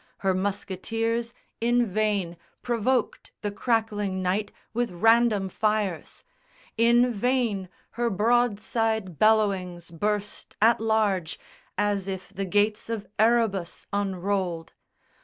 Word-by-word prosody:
Her 190 - +4
musketeers 225 +4 -2 0.3
in 240 +1 +2
vain 200 -4 0 0.3
Provoked 245 0 0
the 205 - -2
crackling 205 -3 -1
night 200 +3 0 0.2
with 240 +1 0
random 225 +2 +3
fires: 210 -3 -2 0.5
In 240 +2 +4
vain 225 -4 0 0.2
her 240 0 -1
broadside 220 -3 +1
bellowings 195 -6 +2
burst 205 +4 -3
at 225 +2 +5
large 210 -6 +1 0.4
As 205 -2 0
if 190 -1 -6
the 195 +1 -3
Gates 210 +3 +1
of 225 -3 -3
Erebus 220 -6 +1
unrolled. 190 -3 -2
210 Hz, 100 wpm, -26 LUFS, 190-230 Hz, 0.5 s, at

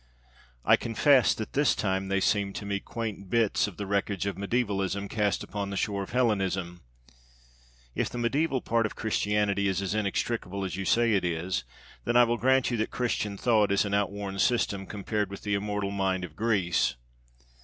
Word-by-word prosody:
I - - +6
confess 125 +3 +3
that 110 - -6
this 145 -2 +3
time 95 -1 -1
they 95 0 +1
seemed 100 -1 +1
to 100 - -5
me 100 0 -1
quaint 105 -4 -6
bits 115 -2 +2
of 100 - -9
the 105 - -4
wreckage 100 -1 -1
of 100 -2 -2
mediævalism 100 -2 -1
cast 105 -2 0
upon 100 0 -4
the 100 - -4
shore 100 0 -1
of 95 - -6
Hellenism. 95 -7 0 1.1
If - - -1
the - - -7
mediæval 135 +3 0
part 115 -1 +2
of - - -11
Christianity 105 -2 0
is 95 -1 0
as 95 -1 -2
inextricable 100 -1 -2
as 90 -3 -4
you 95 0 -4
say 115 +1 +3
it 100 - +2
is, 85 -5 -2 0.4
then 120 0 +2
I 120 - +8
will 120 0 +1
grant 130 +1 +3
you 120 - 0
that 110 - -1
'Christian 105 -5 -2
thought' 110 -2 +3
is 100 +1 +3
an 100 - -3
outworn 100 -1 -1
system 100 -5 +1
compared 105 0 -2
with 100 - -9
the 105 - -1
immortal 105 0 -1
mind 95 -2 0
of 80 -4 -8
Greece. 100 -6 +1
100 Hz, 185 wpm, -28 LUFS, 95-115 Hz, 1.1 s, I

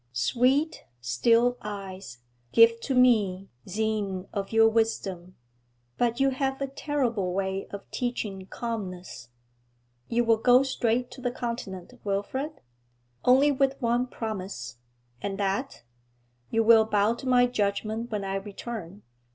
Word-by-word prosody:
'Sweet, 255 - +1
still 230 - +2
eyes 190 -11 -7 0.3
give 230 - +6
to 265 +3 -2
me 205 -7 +3 0.2
seine 205 -2 -2
of 200 -1 -3
your 225 0 +6
wisdom! 195 -5 -1 0.6
But 240 0 +1
you 270 0 +3
have 270 0 -1
a 275 - -1
terrible 255 -9 -1
way 190 0 -2
of 200 -1 -8
teaching 210 -6 -3
calmness.' 185 - -6 0.8
'You 240 +1 +1
will 230 -1 +4
go 245 +3 +5
straight 245 -2 0
to 260 - -10
the 245 - 0
Continent, 235 -6 -5
Wilfrid?' 260 +10 -3 0.6
'Only 270 +4 +5
with 275 0 +1
one 240 0 +1
promise.' 190 - -5 0.4
'And 195 -1 -3
that?' 200 +7 -2 0.7
'You 225 0 +2
will 225 -1 +7
bow 210 0 +2
to 240 +3 -8
my 250 -1 +5
judgment 220 0 -1
when 210 -3 -3
I 195 0 -1
return.' 200 -1 -7
225 Hz, 130 wpm, -27 LUFS, 195-245 Hz, 0.8 s, will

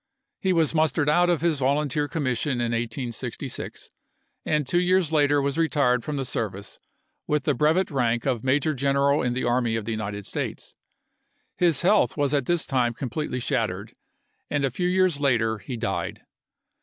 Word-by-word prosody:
He 190 - +1
was 165 -4 +2
mustered 155 -1 +2
out 175 +3 +4
of 170 -5 +1
his 165 -4 +1
volunteer 145 +2 +1
commission 140 -4 -1
in 120 -1 -1
1866, 120 +2 -4 0.5
and 150 -2 0
two 175 +7 +1
years 180 -2 +2
later 145 -2 +3
was 140 +2 -1
retired 140 -7 +2
from 150 -1 -3
the 135 - -2
service 100 -4 -4 0.5
with 150 -2 +1
the - - +2
brevet 160 +8 +2
rank 120 -4 0
of 125 -5 0
Major 145 +4 +2
General 140 +1 +2
in 125 -1 0
the 130 - -2
Army 120 -1 +1
of 110 -2 -3
the 115 - -3
United 105 -2 -4
States. - - -4 0.8
His 170 -5 +2
health 200 -1 +3
was 145 -1 +1
at 140 -4 +1
this 175 -1 +1
time 125 -4 0
completely 130 +1 -3
shattered, - - -2 0.6
and 145 -1 0
a 135 - -1
few 180 +8 -1
years 185 -4 +2
later 115 -6 +1
he 125 +1 -6
died. - - -3
140 Hz, 170 wpm, -25 LUFS, 120-155 Hz, 0.8 s, out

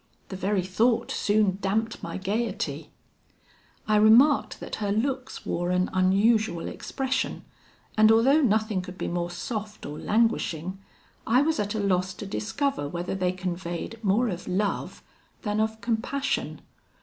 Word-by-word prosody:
The 190 - -5
very 195 0 0
thought 225 +6 +1
soon 205 -2 +1
damped 220 +4 -1
my 170 - -5
gaiety. 210 +3 -2 1.0
I 215 -1 +4
remarked 235 +7 +5
that - - -6
her 205 -2 -1
looks 255 +4 -2
wore 175 +1 -1
an 180 0 +1
unusual 195 0 +2
expression, 265 0 -3 0.5
and 215 0 +6
although 260 +7 +5
nothing 215 -5 +1
could 180 0 -9
be - - -3
more 175 0 -2
soft 210 +4 -5
or 150 +1 -6
languishing, 190 -5 0 0.5
I 250 +5 +4
was 320 0 0
at 205 +1 -1
a - - -1
loss 185 -2 0
to 205 - -7
discover 220 - -2
whether 175 +2 -3
they 185 -2 0
conveyed 185 +4 -5
more 215 +5 +3
of 180 -2 -5
love 195 +2 -2 0.4
than 210 0 -1
of 220 0 0
compassion. 245 +5 -2
210 Hz, 145 wpm, -26 LUFS, 185-230 Hz, 1.0 s, and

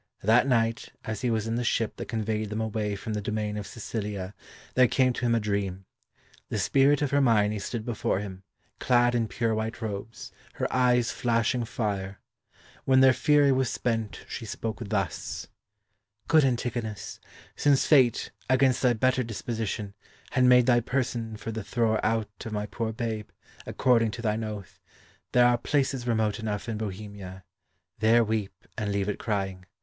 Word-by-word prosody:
That 115 +6 +4
night, 115 -2 +1
as 110 -2 -4
he 125 - 0
was 110 -2 0
in 115 +1 -1
the 120 - -1
ship 115 -1 0
that - - -6
conveyed 110 -2 -2
them 110 +1 -3
away 110 -2 -2
from 110 +2 -5
the 105 - -2
domain 105 0 -2
of 105 -1 -5
Sicilia, 105 -4 -5 0.4
there 130 -1 +5
came 130 +1 +2
to 120 - -3
him 115 - +3
a - - +2
dream. 100 -3 -2 0.6
The - - -2
spirit 140 +1 +3
of 140 - -1
Hermione 110 -7 +3
stood 110 +2 -4
before 115 -5 -1
him, 95 -2 -7 0.4
clad 120 -1 +3
in 115 -2 +1
pure 115 0 -1
white 110 +1 -3
robes, 110 0 -6 0.2
her - - -2
eyes 125 -2 +3
flashing 120 +1 0
fire. 100 -4 -3 0.6
When 130 0 +4
their 130 -1 +7
fury 145 +1 +4
was 130 -2 +2
spent, 115 -4 -2
she - - -6
spoke 110 +1 -4
thus: 100 -6 -2 0.8
"Good 160 -2 +5
Antigonus, 120 -4 -3 0.4
since 145 -2 +3
Fate, 130 -6 +4 0.2
against 130 -1 +3
thy 125 -2 +4
better 130 +3 +2
disposition, 110 -3 -4 0.4
had 130 -2 +3
made 125 -1 +6
thy 120 -1 +5
person 120 -3 -2
for 115 - -5
the 110 -1 -4
thrower 110 0 0
out 110 -2 0
of 110 - -6
my 105 -1 -2
poor 110 +1 -3
babe, 110 -2 -4 0.4
according 115 -3 +3
to 115 +3 -7
thine 110 0 0
oath, 105 -4 -7 0.5
there 125 0 +5
are 120 -1 +4
places 135 -2 0
remote 110 -2 +1
enough 105 -1 -3
in 110 -2 -3
Bohemia; 100 -2 -7 0.6
there 115 +2 +5
weep, 105 -4 -3
and 105 -2 -2
leave 100 -1 0
it 105 - -2
crying. 95 -4 -2
115 Hz, 170 wpm, -27 LUFS, 105-120 Hz, 0.8 s, their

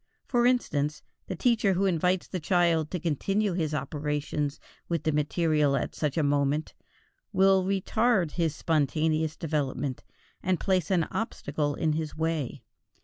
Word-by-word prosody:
For 240 -1 +3
instance, 155 - 0 0.2
the 185 - -3
teacher 220 -1 +2
who 190 +2 +1
invites 180 0 +1
the 185 - -4
child 165 -2 +2
to 180 - -3
continue 195 +6 0
his 160 -4 -1
operations 150 0 -2 0.3
with 170 -1 -1
the 155 - +1
material 150 -1 +2
at - - -3
such 150 0 -2
a 160 - +3
moment, 145 +1 +1 0.6
will 190 -1 +4
retard 195 -1 +1
his 165 -3 -1
spontaneous 155 0 0
development 145 -4 -2 0.4
and 185 -2 0
place 185 -4 +1
an 180 -4 +3
obstacle 145 -9 -2
in 155 -1 0
his 155 -1 -3
way. 155 -6 -2
160 Hz, 145 wpm, -28 LUFS, 150-185 Hz, 0.6 s, will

